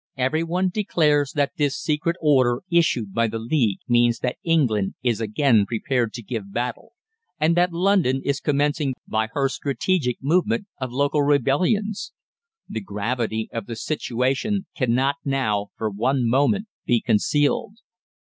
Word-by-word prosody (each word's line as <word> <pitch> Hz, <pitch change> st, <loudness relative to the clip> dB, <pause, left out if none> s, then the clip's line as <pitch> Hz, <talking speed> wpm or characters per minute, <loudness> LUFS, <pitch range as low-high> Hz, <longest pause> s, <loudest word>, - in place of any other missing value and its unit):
"Every 130 Hz, +5 st, +1 dB
one 180 Hz, +3 st, 0 dB
declares 150 Hz, -9 st, +1 dB
that 140 Hz, -2 st, +1 dB
this 145 Hz, -2 st, 0 dB
secret 160 Hz, +2 st, -1 dB
order 130 Hz, -5 st, +3 dB
issued 130 Hz, -, +2 dB
by 115 Hz, +2 st, +2 dB
the 115 Hz, +1 st, -4 dB
League 115 Hz, -3 st, 0 dB
means 120 Hz, -1 st, +3 dB
that 125 Hz, -, -2 dB
England 125 Hz, -, +1 dB
is 120 Hz, -3 st, 0 dB
again 110 Hz, -1 st, +2 dB
prepared 120 Hz, 0 st, -1 dB
to 120 Hz, -, -7 dB
give 105 Hz, -3 st, -5 dB
battle, 125 Hz, -, -4 dB, 0.5 s
and 160 Hz, +2 st, +3 dB
that 175 Hz, +1 st, +3 dB
London 175 Hz, -7 st, +2 dB
is 140 Hz, 0 st, 0 dB
commencing 145 Hz, -1 st, 0 dB
by 110 Hz, 0 st, 0 dB
her 140 Hz, -1 st, +1 dB
strategic 135 Hz, +2 st, -1 dB
movement 185 Hz, -, +1 dB
of 130 Hz, -2 st, -4 dB
local 145 Hz, +3 st, +1 dB
rebellions. 180 Hz, -, +1 dB, 0.5 s
The 110 Hz, -, -5 dB
gravity 110 Hz, +2 st, -2 dB
of 115 Hz, -3 st, -4 dB
the 115 Hz, -, -5 dB
situation 135 Hz, -, -1 dB
cannot 130 Hz, +2 st, +1 dB
now, 125 Hz, -8 st, 0 dB
for 110 Hz, -1 st, -2 dB
one 125 Hz, +4 st, 0 dB
moment, 145 Hz, -, +2 dB, 0.2 s
be 120 Hz, -, +2 dB
concealed. 145 Hz, -, +1 dB
135 Hz, 145 wpm, -23 LUFS, 115-155 Hz, 0.5 s, order